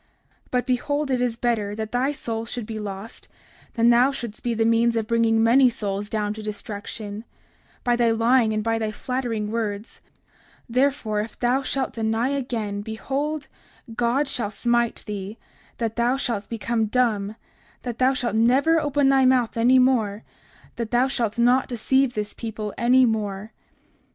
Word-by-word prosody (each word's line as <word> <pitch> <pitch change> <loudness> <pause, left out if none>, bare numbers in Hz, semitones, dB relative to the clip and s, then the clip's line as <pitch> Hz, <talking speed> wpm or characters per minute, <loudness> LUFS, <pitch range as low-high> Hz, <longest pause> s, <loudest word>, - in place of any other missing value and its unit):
30:47 - - -39 0.4
But 250 -1 0
behold, 285 +3 -1
it 250 -1 +1
is 245 -2 0
better 220 -4 -1
that 220 0 -5
thy 255 +3 +1
soul 230 -5 -4
should 240 -1 -5
be 220 0 -5
lost 200 +1 -7 0.5
than 235 0 +5
that 235 - +5
thou 275 - +1
shouldst 235 -5 -6
be 235 -1 -1
the 225 0 +1
means 230 +1 +3
of 225 -1 0
bringing 225 0 +2
many 250 +3 +6
souls 205 -3 -3
down 210 -1 -1
to 215 - -8
destruction, 210 0 -6 0.6
by 245 -1 +2
thy 240 -1 +3
lying 230 +1 +3
and 215 0 -1
by 225 0 0
thy 220 -1 -1
flattering 230 -3 -3
words; 215 -1 -4 0.7
therefore 250 -4 +1
if 215 +1 -8
thou 250 +2 +1
shalt 270 0 -2
deny 225 +2 0
again, 230 -7 -2
behold 275 +8 -3 0.5
God 245 +5 +1
shall 230 -6 -2
smite 235 +2 0
thee, 205 0 -6 0.4
that 225 -1 -3
thou 240 +3 +2
shalt 230 -6 -3
become 230 -1 -1
dumb, 215 -3 0 0.5
that 240 -2 -5
thou 260 +1 +3
shalt 245 -4 -2
never 265 +8 +4
open 290 -2 +1
thy 270 -1 +4
mouth 255 -3 +3
any 240 +3 +4
more, 230 -5 +2 0.5
that 230 -2 -3
thou 245 +2 +3
shalt 235 -4 -2
not 245 +3 +3
deceive 260 +2 +1
this 210 -1 -3
people 220 -2 -5
any 255 +2 +4
more. 210 -2 -2
230 Hz, 170 wpm, -24 LUFS, 215-255 Hz, 0.7 s, many